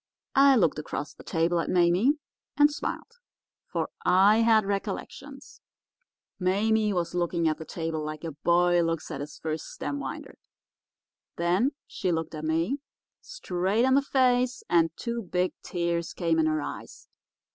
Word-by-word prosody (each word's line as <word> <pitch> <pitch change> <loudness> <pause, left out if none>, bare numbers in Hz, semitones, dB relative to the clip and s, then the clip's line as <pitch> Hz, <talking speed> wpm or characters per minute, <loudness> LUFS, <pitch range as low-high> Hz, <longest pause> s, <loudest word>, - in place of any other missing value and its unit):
I 275 0 +6
looked 170 - +2
across 150 -1 -5
the - - -15
table 170 +1 +1
at - - -2
Mame 180 - +3 0.4
and 295 0 +6
smiled, 465 +10 -5 0.5
for - - -3
I 195 +4 +5
had 225 -2 +4
recollections. 200 0 -5 0.8
Mame 210 +3 +1
was 175 -1 -1
looking 170 -1 0
at 155 - 0
the 160 - -7
table 160 -2 -4
like 155 +1 -6
a 165 - -4
boy 175 +3 +3
looks 165 0 -2
at 140 -2 -5
his 150 +1 -8
first 155 -1 -4
stem 145 -1 -5
winder. 135 -1 -7 1.0
Then 180 - +1
she 185 -5 -2
looked 165 -1 -2
at 155 0 -5
me, 165 - 0 0.4
straight 215 - -1
in 260 - +3
the 275 - +5
face, 255 -2 +1
and 165 -1 +4
two 235 -1 -3
big 180 -2 -1
tears 170 -1 -2
came 165 -2 0
in 160 - +3
her 155 -1 0
eyes. - - -8
175 Hz, 155 wpm, -27 LUFS, 165-220 Hz, 1.0 s, I